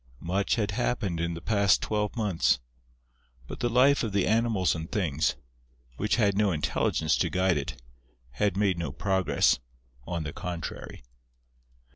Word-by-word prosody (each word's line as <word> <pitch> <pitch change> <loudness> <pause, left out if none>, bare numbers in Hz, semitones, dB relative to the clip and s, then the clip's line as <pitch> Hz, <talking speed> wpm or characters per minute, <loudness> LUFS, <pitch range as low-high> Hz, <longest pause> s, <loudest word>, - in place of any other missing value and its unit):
Much 95 +4 0
had 105 -3 -1
happened 105 -5 -1
in 85 0 -2
the 85 - -7
past 100 -1 +3
twelve 105 0 -2
months; 105 -7 +1 0.9
but - - -8
the 120 - 0
life 130 +4 +4
of 110 -4 -3
the 100 -2 +2
Animals 110 -6 +2
and 80 0 -6
Things, 80 -7 0 0.6
which 105 +1 +1
had 100 -5 +2
no 105 -1 +2
intelligence 75 0 0
to - - +1
guide 95 -1 +2
it, 70 -3 -4 0.5
had 95 +9 0
made 100 -4 +1
no 80 -5 -3
progress, 95 -7 +2 0.5
on 85 -1 -2
the 70 - -5
contrary. 85 -7 -6
95 Hz, 150 wpm, -28 LUFS, 85-105 Hz, 0.9 s, life